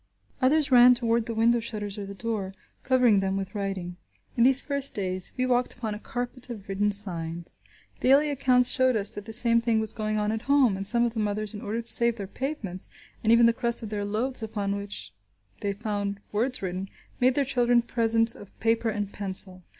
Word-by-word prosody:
Others 280 +2 +2
ran 250 0 +7
toward 235 -1 -1
the 230 - -4
window 235 +2 +2
shutters 210 -3 -5
or 200 - -6
the 200 - -9
door, 200 -3 -4 0.3
covering 250 -6 +3
them 195 0 -2
with 195 -1 -5
writing. 195 -4 -5 0.4
In 235 - -1
these 265 +1 +6
first 280 -1 +2
days 185 -2 -1
we 255 - 0
walked 250 -1 0
upon 225 -3 -5
a 210 - -7
carpet 245 +2 -6
of 215 -5 -9
written 200 +1 0
signs. 170 -5 -1 0.4
Daily 285 +3 +3
accounts 250 -3 +4
showed 260 -1 +2
us 205 -1 0
that 205 - -8
the 225 - -8
same 230 0 +6
thing 230 -1 +1
was 220 0 -1
going 215 -1 -3
on 210 0 -1
at 220 0 -3
home, 270 -8 +4
and 195 +1 -1
some 235 +2 +4
of 235 - -3
the 225 - -4
mothers, 210 0 -2
in 205 - -8
order 225 +3 -4
to 230 - +3
save 235 -1 +2
their 205 -4 -6
pavements, 200 -5 -5 0.4
and 220 - +2
even 235 0 +6
the 230 - +4
crust 235 -1 -1
of 220 - -6
their 205 -1 -4
loaves 230 +6 -3
upon 205 -2 -3
which 200 0 -6 0.5
they 200 - -2
found 200 -1 -4
words 240 +2 -2
written, 185 +1 -4 0.3
made 255 0 +2
their 285 - +1
children 245 -2 +2
presents 230 -1 +3
of 205 - -15
paper 225 0 0
and 205 -2 -4
pencil. 190 -2 0
225 Hz, 210 wpm, -26 LUFS, 200-245 Hz, 0.5 s, ran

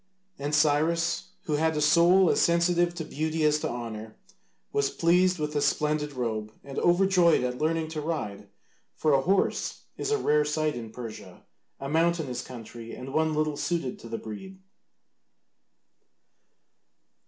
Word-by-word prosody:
And 145 +2 -1
Cyrus, 155 +3 +1
who 150 -2 -1
had 160 0 +1
a - - +1
soul 170 +4 +5
as - - +2
sensitive 175 0 +2
to 165 -2 -4
beauty 155 +1 -2
as 150 0 +3
to - - -2
honour, 110 -2 -6 0.6
was 140 -1 +2
pleased 180 +4 +3
with 150 -1 -3
the 145 - 0
splendid 150 0 0
robe, 110 -4 -3
and 135 -1 -5
overjoyed 175 -3 +4
at 125 0 -2
learning 160 0 0
to 155 -1 -4
ride, 105 -11 -4 0.5
for 155 -2 +2
a 135 - +4
horse 190 +7 0
is - - -3
a 435 - +2
rare 150 - +2
sight 150 +1 0
in 115 -2 -6
Persia, 115 -1 -9 0.4
a 135 - -5
mountainous 160 -5 0
country, 115 -1 -9
and 130 +1 -8
one 160 0 +1
little 155 -1 0
suited 150 -4 -2
to 115 - -11
the 115 - -3
breed. 190 - -8
150 Hz, 155 wpm, -27 LUFS, 125-170 Hz, 0.6 s, soul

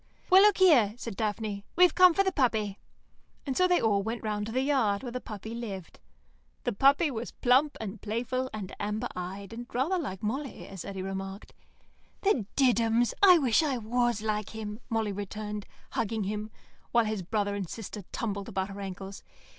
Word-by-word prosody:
"Well, 380 +1 +9
look 415 -1 +6
here," 260 - +5
said 230 -4 -6
Daphne, 210 -1 -2
"we've 360 0 +6
come 365 -2 +7
for 395 - +4
the 380 - +1
puppy," 220 - 0 0.7
and 270 -3 -2
so 365 - +4
they 360 -1 +3
all 205 -3 +2
went 225 +3 -4
to 210 0 -2
the 255 +3 +1
yard, 250 -8 +1
where 245 - -5
the 250 +1 -4
puppy 220 +1 -7
lived. 205 -7 -7 0.6
The 245 - 0
puppy 280 +8 +4
was 235 -1 -4
plump 265 +4 +3
and 215 -1 -6
playful 250 +4 -2
and 205 -4 -6
amber 210 +4 -2
eyed, 190 +3 -6
and 240 +1 -7
rather 315 +10 +1
like 195 - -5
Molly, 265 +6 -3
as 190 -4 -8
Eddy 195 -1 -5
remarked. 195 +1 -6 0.7
"The 290 - +2
Diddums! 235 -3 +3
I 370 -3 +9
wish 260 -6 +3
I 285 -5 0
was 240 -1 0
like 215 0 -2
him," 210 -1 -5
Molly 225 -3 0
returned, 210 +1 -5 0.2
hugging 220 -1 -1
him, 210 +2 -3 0.4
while 235 -1 +4
his 215 -2 -2
brother 205 +2 -1
and 195 -4 -4
sister 215 -1 -6
tumbled 200 -3 -3
about 190 0 -2
her 200 0 -7
ankles. 195 0 -7
220 Hz, 180 wpm, -29 LUFS, 200-255 Hz, 0.7 s, Well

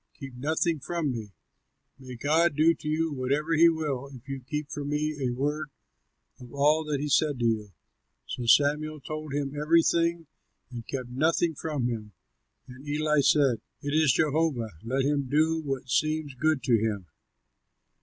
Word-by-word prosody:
Keep 135 -4 -9
nothing 160 +4 0
from 165 0 -2
me; 110 -4 -6 0.7
may 130 -1 -9
God 155 +5 +2
do 160 +3 +5
to 155 - -10
you 155 0 0
whatever 140 +5 -1
he 165 +1 +6
will, 150 -5 -2
if 130 -1 -13
you 135 0 -4
keep 150 +3 -5
from 145 -1 -4
me 150 +1 -1
a 125 - +1
word 145 +5 -2 0.7
of 125 -1 -12
all 150 +3 +3
that 150 -2 -1
he 150 - -2
said 145 -1 +2
to 120 - -1
you." 110 -3 0 0.5
So 120 -2 -5
Samuel 150 +4 +3
told 155 +2 -6
him 140 -1 -2
everything, 165 +2 +2 0.5
and 120 -2 -8
kept 130 -3 -4
nothing 160 +5 +1
from 150 -4 -3
him. 110 -3 -5 0.5
And 130 +2 -12
Eli 150 0 +2
said, 135 -5 +3 0.2
"It 145 0 -2
is 155 -3 +4
Jehovah; 145 -5 +1
let 130 +4 0
him 140 -1 0
do 160 +3 +2
what 135 -3 -4
seems 155 +2 0
good 155 0 0
to 120 -4 +3
him." 105 -4 -2
145 Hz, 165 wpm, -27 LUFS, 130-155 Hz, 0.7 s, he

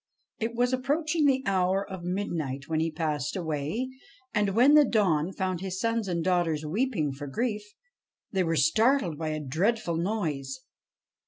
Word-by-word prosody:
It 230 0 -2
was 245 +1 +1
approach 290 +5 0
ing 305 -3 +4
the 265 -1 +2
hour 190 0 +1
of 190 -3 -7
midnight 165 -8 -3
when 160 -1 0
he 165 +1 +1
passed 155 -3 -2
away; 160 - -2 0.5
and, 205 -3 +1
when 255 +6 +6
the 300 0 +8
dawn 190 - +2
found 185 -2 -2
his 190 -1 -4
sons 230 -2 0
and 170 -2 -1
daughters 170 -4 +1
weeping 185 - 0
for 145 +2 -7
grief, 210 - -1 0.7
they 190 -2 +1
were 165 -1 0
startled 185 - +3
by 160 - -2
a 155 0 -2
dreadful 170 - 0
noise. 155 -9 -2
185 Hz, 165 wpm, -28 LUFS, 155-230 Hz, 0.7 s, the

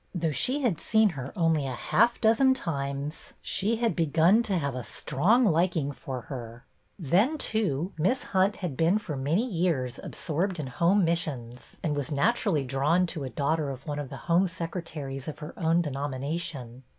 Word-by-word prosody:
Though 165 -2 0
she 255 - +1
had 205 -11 +1
seen 220 -1 +3
her 135 -6 -6
only 165 -6 +2
a 130 - -3
half 235 - +2
dozen 245 +4 +4
times, 140 - -4
she 210 +4 0
had 230 0 0
begun 165 +6 +4
to 205 -5 0
have 140 -4 -1
a 125 -1 -4
strong 215 - +2
liking 165 -5 +2
for 130 -2 -6
her. 120 -1 -8 0.3
Then, 200 - +2
too. 195 - -1
Miss 245 +12 +1
Hunt 190 +1 +2
had 175 -8 -4
been 165 +8 +3
for 165 -8 -5
many 150 - +1
years 165 - -1
absorbed 180 +3 -2
in 150 - -2
Home 170 +9 +2
Missions, 135 -8 -3
and 150 -3 0
was 145 -1 -3
naturally 175 0 +1
drawn 140 +7 +2
to 160 -4 -4
a - - -4
daughter 150 +2 0
of 135 -1 -7
one 145 -1 -3
of 145 -3 -5
the 135 - -7
home 175 +3 +3
secretaries 165 -6 -5
of 155 - -5
her 150 -1 -8
own 165 0 +2
de 150 - -3
nomination. 135 -2 -4
160 Hz, 180 wpm, -28 LUFS, 140-190 Hz, 0.3 s, dozen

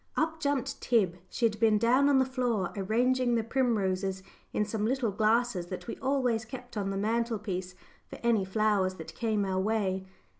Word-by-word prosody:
Up 320 0 0
jumped 280 -2 -1
Tib 195 -8 +2
she 235 - 0
had 215 -2 0
been 220 -2 +4
down 255 +6 +4
on 280 - +5
the 260 - +4
floor 250 -6 -1
arranging 240 +5 +1
the 230 - +1
primroses 195 -6 0 0.3
in 210 - 0
some 210 0 -3
little 240 -1 +1
glasses 215 -2 +1
that 185 0 -6
we 235 - -5
always 255 -4 0
kept 245 +1 -9
on 200 -2 -1
the 195 - -2
mantelpiece 210 -4 -2 0.3
for - - -9
any 230 -4 +3
flowers 190 -1 +1
that 160 - -9
came 215 -3 0
our 190 -1 -1
way. 190 -2 0
220 Hz, 180 wpm, -29 LUFS, 195-245 Hz, 0.3 s, on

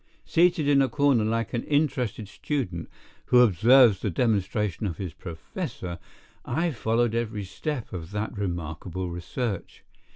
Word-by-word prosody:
Seated 170 -3 +3
in 140 -1 +5
a 135 - +2
corner 140 -6 +3
like 115 +1 -1
an 120 - 0
interested 130 -8 0
student 95 - -3 0.4
who 125 - +6
observes 115 0 +6
the 105 - -1
demonstration 105 -1 0
of 85 - -4
his 90 -5 -5
professor, 85 +1 -6 0.4
I 165 +7 0
followed 115 -1 +1
every 110 -3 -2
step 125 - -5
of 85 -3 -6
that 105 +2 -3
remarkable 90 -1 -4
research. 100 +4 -4
110 Hz, 135 wpm, -26 LUFS, 95-130 Hz, 0.4 s, who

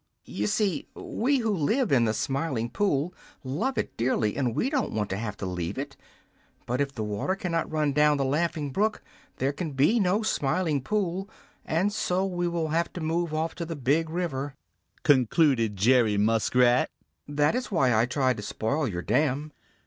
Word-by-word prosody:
"You - - -2
see, 205 -4 0
we 275 +5 0
who 225 -3 0
live 210 - +1
in 120 -4 +4
the 110 - +1
Smiling 135 -5 -1
Pool 180 - 0 0.3
love 150 - -2
it - - -2
dearly, 115 -3 +1
and 125 -4 -1
we - - +1
don't 270 -4 0
want 105 -3 -2
to - - 0
have 105 -2 -4
to - - -5
leave 90 +2 -3
it, 140 +1 -5 0.7
but 125 +3 -1
if 140 -1 0
the 115 -5 -4
water 105 - -1
cannot 170 -4 -2
run 150 -2 +1
down 150 0 +4
the 135 - 0
Laughing 150 0 -1
Brook, 215 +9 0 0.3
there 135 +2 0
can 155 -1 -4
be 150 - +3
no 200 +2 +2
Smiling 155 -4 0
Pool, 195 +3 -1 0.4
and 185 +6 +1
so 190 -2 0
we 175 -2 -1
will 170 -2 -1
have 165 +2 0
to - - -5
move 165 +1 -1
off 160 +1 -1
to 170 - -5
the 165 0 -5
Big 145 +4 +1
River," 145 -5 -3 0.5
concluded 130 -4 +3
Jerry 110 +1 +3
Muskrat. 120 +4 +3 0.4
"That 145 +3 +2
is 250 +1 -2
why 135 - +3
I 110 +2 +3
tried 130 -1 +1
to - - -5
spoil 135 +8 -1
your 90 -5 -4
dam." 145 +2 0
145 Hz, 185 wpm, -27 LUFS, 125-175 Hz, 0.7 s, in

